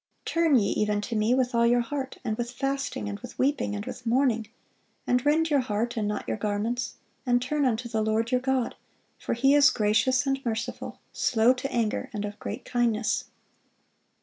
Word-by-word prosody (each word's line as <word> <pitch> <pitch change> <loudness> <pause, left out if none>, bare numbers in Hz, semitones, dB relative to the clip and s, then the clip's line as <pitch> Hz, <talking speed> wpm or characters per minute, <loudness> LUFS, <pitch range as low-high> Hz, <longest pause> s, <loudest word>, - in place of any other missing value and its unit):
"Turn 330 -3 +3
ye 200 -4 +2
even 210 -1 +1
to 230 +2 -4
Me 215 +3 +3
with 255 -1 +1
all 235 0 +3
your 240 +1 +4
heart, 265 +2 -4
and 220 -2 0
with 235 +1 -3
fasting, 275 - -3
and 100 0 -5
with - - -10
weeping, 270 -6 0
and 205 +1 -5
with 250 - -7
mourning: 235 -2 +1 0.6
and 250 0 +2
rend 315 +2 +2
your 285 - +4
heart, 230 -1 -1
and 215 -3 -1
not 210 - -3
your - - -1
garments, 215 +4 -2 0.3
and 245 -1 +3
turn 285 +3 0
unto 240 -1 0
the 220 -2 -1
Lord 220 +2 0
your 250 0 +2
God: 260 -2 0 0.5
for - - -2
He 270 +4 +4
is 290 -1 +7
gracious 225 +5 +2
and 270 0 -1
merciful, 230 +1 -4 0.2
slow 230 +2 +3
to 260 +1 -5
anger, 235 +2 -1
and 210 -1 -3
of 205 0 -7
great - - -6
kindness." 235 -2 0
240 Hz, 195 wpm, -27 LUFS, 220-265 Hz, 0.6 s, is